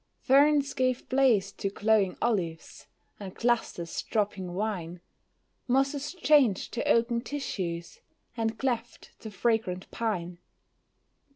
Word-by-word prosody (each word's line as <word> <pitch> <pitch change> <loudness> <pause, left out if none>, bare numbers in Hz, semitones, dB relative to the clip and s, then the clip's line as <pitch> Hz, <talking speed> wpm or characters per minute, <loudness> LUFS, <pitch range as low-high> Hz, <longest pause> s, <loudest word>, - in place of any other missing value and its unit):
Ferns 285 +1 +4
gave 255 -1 0
place 245 -7 +3
to 195 - -3
glowing 205 -2 +1
olives, 180 -9 -2 0.3
and 195 -3 -8
clusters 230 -8 -1
dropping 195 -5 -2
wine, 180 -4 -3 0.7
Mosses 275 +5 0
changed 290 - +3
to 235 - -2
oaken 235 0 +2
tissues, 185 -12 -5 0.4
and 225 -1 -2
cleft 240 -3 -3
to 220 - -8
fragrant 210 -3 -1
pine. 180 -7 -3
225 Hz, 105 wpm, -28 LUFS, 185-255 Hz, 0.7 s, Ferns